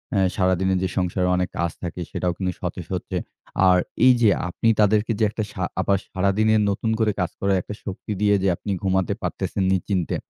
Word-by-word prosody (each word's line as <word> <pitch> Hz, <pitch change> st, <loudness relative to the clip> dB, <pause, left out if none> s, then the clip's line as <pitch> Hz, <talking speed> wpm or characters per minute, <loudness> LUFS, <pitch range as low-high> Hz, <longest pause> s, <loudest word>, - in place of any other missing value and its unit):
আ -, -, +3 dB, 0.2 s
সারাদিনের 95 Hz, 0 st, +2 dB
যে, -, -, +1 dB
সংসারের 90 Hz, 0 st, +1 dB
অনেক 90 Hz, 0 st, 0 dB
কাজ 85 Hz, -1 st, 0 dB
থাকে 90 Hz, 0 st, -5 dB
সেটাও 90 Hz, -, -1 dB
কিন্তু 95 Hz, -1 st, -1 dB
সতেজ -, -, -4 dB
হচ্ছে। -, -, -4 dB, 0.5 s
আর 90 Hz, -, +5 dB, 0.3 s
এই 130 Hz, -, +8 dB
যে, 110 Hz, -, +6 dB, 0.2 s
আপনি 100 Hz, -, -1 dB
তাদেরকে 105 Hz, +2 st, +3 dB
যে, -, -, +2 dB
একটা 110 Hz, +1 st, -3 dB
সা 95 Hz, -, -4 dB, 0.2 s
আবার 100 Hz, +1 st, +2 dB
সারাদিনে 100 Hz, +3 st, +2 dB
নতুন 105 Hz, +3 st, -1 dB
করে 110 Hz, -1 st, +3 dB
কাজ 90 Hz, -, -1 dB
করার 100 Hz, 0 st, +2 dB
একটা 105 Hz, -, -8 dB
শক্তি 100 Hz, +1 st, -6 dB
দিয়ে 105 Hz, -1 st, +4 dB
যে, -, -, +3 dB
আপনি 100 Hz, -, -5 dB
ঘুমাতে 95 Hz, -1 st, +1 dB
পারতেসেন 100 Hz, -, -2 dB
নিশ্চিন্তে 95 Hz, -2 st, -1 dB
95 Hz, 190 wpm, -23 LUFS, 90-105 Hz, 0.5 s, এই